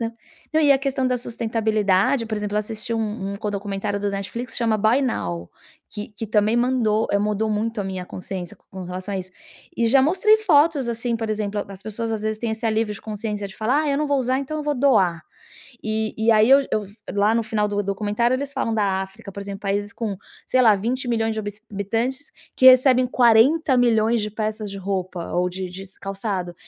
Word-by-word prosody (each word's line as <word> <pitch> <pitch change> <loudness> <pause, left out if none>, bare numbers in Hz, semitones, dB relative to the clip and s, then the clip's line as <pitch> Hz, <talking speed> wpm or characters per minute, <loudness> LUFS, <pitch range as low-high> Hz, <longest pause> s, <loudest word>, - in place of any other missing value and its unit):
não. 230 0 -3 0.4
Não, 315 - +4
e 285 -1 +6
a 270 - +3
questão 270 -1 -1
da 250 -1 +1
sustentabilidade, 220 -1 +1
por 220 - -3
exemplo, 210 0 -3
eu - - +3
assisti 220 +2 -2
um 210 -3 -3
um - - -5
co 210 0 -3
documentário 200 0 -3
do 205 - -1
Netflix 225 +5 -5
que - - -2
chama 225 -2 +1
Buy 225 +6 +3
Now, 85 - -3 0.4
que 210 - -6
que 225 - -4
também 215 +2 +2
mandou 240 -3 +2
eh, 200 - +3
mudou 210 +1 0
muito 215 +1 -1
a - - -3
minha 190 -1 -4
consciência 185 -1 -6
co - - -37
com 190 -1 -6
relação 185 +3 -6
a - - -1
isso. 185 0 -7 0.5
E 230 - +4
já 270 +4 +5
mostrei 385 +8 +4
fotos, 305 - +3
assim, 235 0 -1
por 225 -1 -4
exemplo, 210 -1 -2
a 200 - -8
as 190 - -16
pessoas 225 +2 -4
às 210 - -8
vezes 215 0 -2
têm 225 -1 -2
esse 220 +1 -6
alívio 220 -1 0
de - - -10
consciência 210 -1 -3
de - - -13
falar: 255 +7 +3
"Ah, 290 - 0
eu 280 - +1
não 300 - 0
vou 285 -1 +1
usar. 255 +1 +1
Então 280 +3 -4
eu - - -3
vou 295 -1 0
doar". 185 -10 +3 0.6
E 220 0 -1
e 220 - -1
aí 215 +3 +5
eu 275 - +8
eu 215 - +1 0.4
lá 215 +2 +4
no 230 - 0
final 210 -1 +1
do 205 - -3
documentário 210 +5 0
eles 280 +1 -5
falam 230 -4 -1
da 205 - +2 0.2
África, 195 0 -12
por 200 - -7
exemplo, 200 0 -7
países 205 +1 -1
com, 215 -4 -2 0.4
sei 255 - +5
lá, 215 - +8
20.000.000 230 0 -1
de 220 - -2
habis 205 +1 -7
habitantes 230 +7 -1 0.3
que 260 - +5
recebem 255 -1 +3
40.000.000 240 -2 +4
de 210 - -3
peças 215 -1 -3
de 200 - -7
roupa 185 -2 -3 0.2
ou 180 0 +2
de 190 +1 -6
de 195 - -6
s 190 - -19
calçado 195 -3 -4
220 Hz, 225 wpm, -22 LUFS, 200-240 Hz, 0.6 s, eu